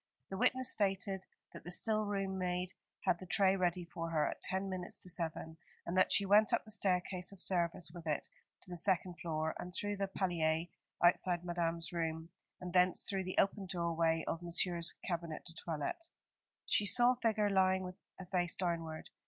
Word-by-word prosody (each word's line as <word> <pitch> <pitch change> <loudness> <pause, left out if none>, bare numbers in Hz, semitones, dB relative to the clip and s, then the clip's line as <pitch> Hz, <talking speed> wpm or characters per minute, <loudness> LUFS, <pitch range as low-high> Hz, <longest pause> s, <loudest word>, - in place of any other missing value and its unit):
The 190 - -3
witness 255 +2 +4
stated 195 -1 0 0.3
that - - -10
the - - -7
still 215 +3 +2
room 195 -1 -1
maid 180 0 -2 0.3
had 175 - +2
the 185 - -9
tray 195 +1 +4
ready 180 -1 0
for 165 0 -5
her 155 -2 +1
at - - -5
ten 190 +1 0
minutes 185 -2 -4
to 185 - -2
seven, 160 -1 -2 0.3
and 170 - -3
that 185 - +4
she 200 - +5
went 210 +2 +5
up - - +1
the 215 - -11
staircase 185 -2 0
of 195 - -11
service 175 -2 +1
with 170 -2 -9
it 150 -2 -1 0.3
to 180 - -7
the 175 - -4
second 180 0 +1
floor, 160 -1 -2
and 180 0 -7
through 205 0 -2
the 195 0 -1
palier 165 -4 0 0.4
outside 175 0 +3
Madame's 170 -1 -2
room, 160 -1 -2 0.3
and 180 -1 -6
thence 180 0 +4
through 195 -2 -1
the 185 - -5
open 195 0 +2
doorway 165 -2 +1
of 165 - -2
Monsieur's 170 0 0
cabinet 170 -3 -4
de 165 - -8
toilette. 170 - -4 0.6
She 205 - +2
saw 240 +4 +5
a - - 0
figure 215 -3 +2
lying 190 -1 +3
with 180 0 -7 0.2
the 190 - -8
face 175 -1 0
downward. 165 -3 -3
180 Hz, 190 wpm, -35 LUFS, 170-195 Hz, 0.6 s, she